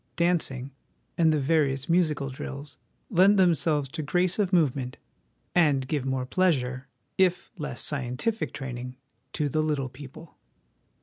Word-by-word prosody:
Dancing, 150 -7 0 0.4
and 160 -2 +4
the 155 - +2
various 140 -2 +1
musical 155 -5 +1
drills, 140 +2 -6 0.3
lend 195 +2 +5
themselves 160 -5 +2
to 160 +3 -5
grace 175 +6 +1
of 195 -3 +1
movement, 135 -7 +1 0.6
and 145 -7 +3
give 140 -2 -1
more 130 -1 -1
pleasure, 130 -5 0 0.3
if 180 -2 +2
less 150 - -4
scientific 140 - -2
training, 125 -2 -6 0.4
to 150 - 0
the 155 +3 0
little 150 -4 -1
people. 145 +5 -12
150 Hz, 130 wpm, -27 LUFS, 135-170 Hz, 0.6 s, lend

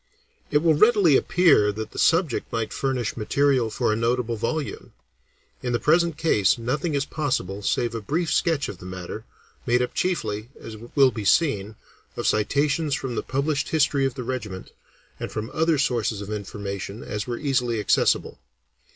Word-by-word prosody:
It 150 +1 +2
will 165 -2 +5
readily 200 - +5
appear 155 - +4
that 110 +1 -6
the - - -7
subject 165 -6 +2
might 115 -1 -2
furnish 125 -6 -2
material 130 +1 +1
for 110 - 0
a - - 0
notable 120 +1 0
volume. 140 +7 -4 0.7
In 125 -1 -2
the 120 - +1
present 165 +4 +2
case 115 - +3
nothing 140 +7 -2
is 140 0 0
possible 115 - -2
save 120 +3 0
a 115 - -4
brief 160 - -1
sketch 160 -5 +1
of 90 - -8
the 90 - -11
matter, 90 -1 -7 0.4
made 120 +1 +3
up 125 - -2
chiefly, 120 - -2
as 110 - -9
will 130 +4 +2
be 110 -2 -5
seen, 105 - +2 0.4
of - - -3
citations 145 +6 +1
from 130 -2 -4
the - - -1
published 140 +2 -1
history 140 -3 +2
of 135 - -6
the 130 - -5
regiment, 110 -7 -5 0.5
and - - -5
from 110 +2 -4
such - - -15
other 160 0 +2
sources 120 -7 0
of 100 +1 -7
information 100 0 -5
as 105 +2 -4
were 120 -1 -3
easily 125 -5 0
accessible. 105 - +1
125 Hz, 175 wpm, -24 LUFS, 110-150 Hz, 0.7 s, will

